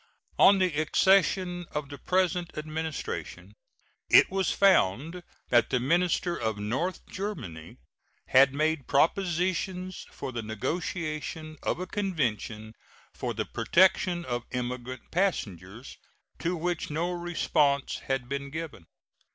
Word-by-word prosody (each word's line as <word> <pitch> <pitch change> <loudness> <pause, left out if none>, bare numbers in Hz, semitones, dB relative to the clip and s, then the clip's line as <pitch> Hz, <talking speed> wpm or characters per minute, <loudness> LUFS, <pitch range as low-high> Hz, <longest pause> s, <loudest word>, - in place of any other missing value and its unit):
On 200 - +8
the 185 -3 +1
accession 180 +1 +2
of 150 -2 -3
the 145 -1 -9
present 180 -1 0
Administration 160 - -5 0.6
it - - +7
was 190 -1 +1
found 165 - +3 0.3
that 120 -1 +4
the 125 - +1
minister 175 +5 +1
for 110 -2 -2
North 130 - -2
Germany 115 - -6 0.5
had 135 +1 +6
made 155 0 0
propositions 180 +3 0
for 135 - -6
the 120 -2 -4
negotiation 155 - -4
of - - -1
a 185 - -3
convention 120 - -2 0.4
for - - -4
the - - -2
protection 180 -1 +2
of 120 -1 -3
emigrant 125 0 -5
passengers, 115 - -2 0.4
to 175 +2 -1
which 175 0 -2
no 165 +4 -1
response 170 -5 0
had 135 -2 -1
been 140 +1 -4
given. 155 - -7
155 Hz, 120 wpm, -28 LUFS, 125-180 Hz, 0.6 s, On